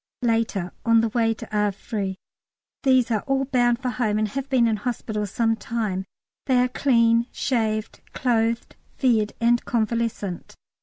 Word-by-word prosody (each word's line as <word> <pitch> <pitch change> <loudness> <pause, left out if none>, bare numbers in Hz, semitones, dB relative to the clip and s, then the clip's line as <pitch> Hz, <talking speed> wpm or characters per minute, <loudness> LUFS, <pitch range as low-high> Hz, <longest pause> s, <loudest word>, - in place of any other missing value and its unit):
Later. 225 -6 0
On 230 -1 +5
way 225 -1 +1
to - - -8
Havre. 205 -1 -1 0.7
These 260 -3 +3
are 215 -2 +1
all 270 0 +1
bound 245 -3 +2
for 255 - 0
home 220 -4 0
and 215 0 0
have 275 +5 -4
been 255 -3 +3
in 220 -1 +1
hospital 215 -2 -3
some 225 +2 +1
time. 215 -4 -3 0.4
They 260 -2 +3
are 250 0 +3
clean, 235 -3 +3
shaved, 220 -4 -1
clothed, 230 -2 0 0.2
fed, 225 -5 +2
and 235 +1 +3
convalescent. 230 -5 -2
230 Hz, 145 wpm, -24 LUFS, 215-245 Hz, 0.7 s, On